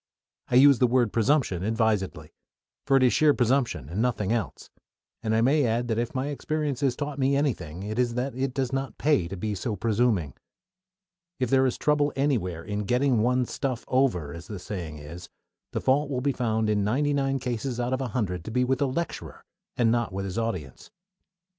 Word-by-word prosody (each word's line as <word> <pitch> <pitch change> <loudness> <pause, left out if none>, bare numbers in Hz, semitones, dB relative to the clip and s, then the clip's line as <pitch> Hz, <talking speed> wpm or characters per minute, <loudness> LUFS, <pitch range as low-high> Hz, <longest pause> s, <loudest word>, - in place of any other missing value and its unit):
I - - -1
use 140 0 +7
the 125 - +5
word 120 -3 +2
"presumption" 115 - +2
advisedly; 105 -8 -1 0.5
for 135 - +5
it 130 - +3
is 125 - +4
sheer 150 -2 +4
presumption 120 - +1
and 90 +8 -3
nothing 115 -5 0
else, 115 -5 -3 0.5
and 110 -1 0
I 110 - +3
may 140 +5 +3
add 120 0 0
that 110 0 0
if 120 +2 -3
my 135 +2 -1
experience 150 -2 -2
has 135 -3 +1
taught 145 0 -4
me 135 +1 +2
anything, 95 - -2
it 110 +3 -4
is 120 -2 +1
that 130 +2 -2
it 130 +2 -2
does 135 -2 -1
not 135 0 -3
pay 145 - +2
to 95 +2 -6
be 105 +3 -2
so 105 +3 -3
presuming. 105 - +1 1.1
If 125 -2 -1
there 130 0 +4
is 125 - -2
trouble 150 -1 +2
anywhere 110 - 0
in 105 +2 -3
"getting 125 +1 +2
one's 125 +1 +1
stuff 130 -4 -3
over," 115 - +1
as 85 0 -9
the 105 - -6
saying 90 -4 -6
is, 80 +4 -10 0.4
the - - -2
fault 140 +2 +2
will 130 -3 -1
be 140 +1 +1
found 110 -3 0
in 105 -1 +1
ninety 140 +8 +1
nine 135 -1 +1
cases 125 0 -3
out 120 +1 -1
of 130 - -1
a 130 - -1
hundred 100 -7 -2
to - - -5
be 125 +3 +1
with 130 +1 0
the 140 - +2
lecturer, 170 +6 -5 0.3
and 115 -2 +3
not 120 -3 0
with 95 +1 -4
his 95 +3 -3
audience. 90 - -4
120 Hz, 205 wpm, -26 LUFS, 105-135 Hz, 1.1 s, use